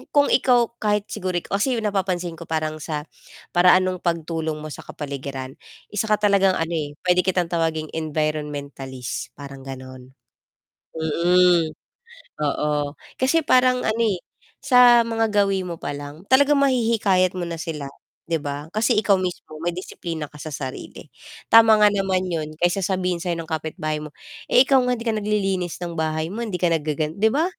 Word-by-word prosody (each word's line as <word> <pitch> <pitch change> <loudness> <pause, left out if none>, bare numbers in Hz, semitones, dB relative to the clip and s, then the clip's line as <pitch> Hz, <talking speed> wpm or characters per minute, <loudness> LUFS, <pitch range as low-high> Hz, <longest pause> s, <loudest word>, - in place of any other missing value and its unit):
kung 285 0 +4
ikaw 245 -3 +3
kahit 210 -1 +1
siguro, 185 -1 -3
kasi 225 +6 0
napapansin 185 -4 -2
ko 170 - -9
parang 155 -1 -2
sa 150 -1 -4 0.5
paraan 180 +1 +5
nung 185 -1 -2
pagtulong 165 -2 -2
mo 155 -1 -7
sa - - -9
kapaligiran, 140 -2 -6 0.3
isa 210 +1 -1
ka 210 - +4
talagang 200 -2 +3
ano, 165 +1 -2
eh, 150 -3 -3
pwede 180 0 +3
kitang 180 -2 0
tawaging 160 -2 -1
environmentalist, 145 -5 -4
parang 140 -1 -9
ganon. 130 0 -10 0.8
Mm, 170 +1 +3 0.7
oo, 150 0 -1 0.2
kasi 285 +4 +1
parang 255 0 +3
ano, 220 +1 0
eh, 190 - -1 0.4
sa 245 -3 +6
mga 225 -1 0 0.2
gawi 195 -1 0
mo 175 -2 -5
pa 145 -1 -5
lang 145 +5 -9
talagang 285 +3 +4
mahihikayat 225 -9 +2
mo 175 - -2
na 165 -1 -5
sila 150 -4 -5 0.4
'di 165 -2 -1
ba, 145 +1 -5
kasi 215 0 +2
ikaw 200 -3 +3
mismo 165 -3 -5
may 175 - 0
disiplina 170 -3 -5
ka 150 0 -13
sa 155 - -6
sarili, 135 -3 -7 0.3
tama 225 -1 +7
nga 210 -1 +5
naman 190 -2 0
yun 155 -3 -4
kesa 175 +3 +1
sabihin 180 -2 -1
sa'yo 175 -2 -2
ng 165 - -5
kapitbahay 155 -1 -3
mo, 150 - -7 0.4
"Eh, 255 +2 +6
ikaw 270 -2 +4
nga 250 -1 0
hindi 230 - -8
ka 225 - +1
naglilinis 195 -4 -1
ng 175 -1 -5
bahay 160 +2 -2
mo 235 - -4
hindi 210 -6 -3
ka 175 -2 +2
naggagan" 155 0 -1
'di 220 - +5
ba? 305 +8 +1
175 Hz, 165 wpm, -23 LUFS, 155-205 Hz, 0.8 s, tama